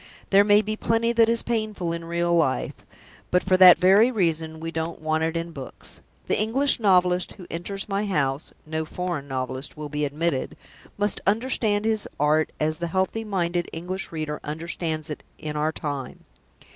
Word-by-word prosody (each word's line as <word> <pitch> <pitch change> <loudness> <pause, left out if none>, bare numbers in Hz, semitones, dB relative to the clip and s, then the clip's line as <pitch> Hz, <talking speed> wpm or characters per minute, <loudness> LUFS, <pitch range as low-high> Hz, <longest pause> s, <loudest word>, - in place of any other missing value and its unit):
There 200 +1 +7
may 205 +1 +5
be 215 +1 -2
plenty 230 +1 +1
that 230 -1 +4
is 230 0 +1
painful 215 -7 -2
in 170 0 -5
real 170 +1 0
life; 160 -6 +1 0.6
but 180 - +2
for 190 -1 +3
that 185 -1 +9
very 195 +6 +5
reason, 165 -7 -1
we 165 +1 -5
don't 165 +1 -4
want 155 0 0
it 165 +1 -1
in 165 0 -4
books. 135 -5 -6 0.3
The - - +1
English 260 +7 +3
novelist 180 -3 +3
who 185 - -12
enters 195 +4 -5
my 200 +1 -1
house 140 -6 -1
(no 160 +1 -2
foreign 170 -3 -4
novelist 130 +1 -4
will 150 -1 -6
be 150 +1 -2
admitted) 145 0 -1 0.4
must 205 -1 0
understand 215 -1 +1
his 220 -2 0
art 150 +2 +2
as 155 +1 0
the 170 - -2
healthy 190 +6 -1
minded 175 -4 -1
English 180 +4 -4
reader 155 -2 -4
understands 155 0 -3
it 150 - -6 0.2
in 150 -1 -5
our 150 +1 +1
time. 145 -4 -5
170 Hz, 175 wpm, -25 LUFS, 155-205 Hz, 0.6 s, that